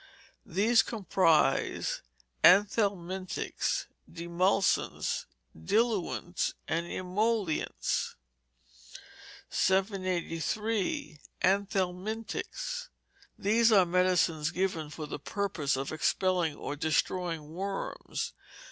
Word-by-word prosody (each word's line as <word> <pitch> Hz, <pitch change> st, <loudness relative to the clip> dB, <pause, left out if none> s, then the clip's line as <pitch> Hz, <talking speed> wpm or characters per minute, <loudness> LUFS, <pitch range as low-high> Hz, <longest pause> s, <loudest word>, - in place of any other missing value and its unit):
These 225 Hz, +6 st, +4 dB
comprise 180 Hz, -, +2 dB, 0.4 s
anthelmintics, 190 Hz, -2 st, +2 dB, 0.3 s
demulcents, 175 Hz, +3 st, 0 dB, 0.3 s
diluents, 185 Hz, -, 0 dB
and 165 Hz, +2 st, -1 dB
emollients. 190 Hz, -1 st, -1 dB, 1.4 s
783. 190 Hz, -, 0 dB, 0.2 s
Anthelmintics. 200 Hz, -, -1 dB, 0.5 s
These 225 Hz, +3 st, +3 dB
are 195 Hz, -4 st, +6 dB
medicines 175 Hz, -3 st, +2 dB
given 175 Hz, -4 st, -1 dB
for 155 Hz, 0 st, -6 dB
the 150 Hz, -, -6 dB
purpose 160 Hz, -6 st, -1 dB
of 135 Hz, +1 st, -3 dB
expelling 170 Hz, 0 st, +1 dB
or 145 Hz, -, -5 dB
destroying 160 Hz, +1 st, -1 dB
worms. 195 Hz, +3 st, -4 dB
185 Hz, 65 wpm, -30 LUFS, 165-205 Hz, 1.4 s, are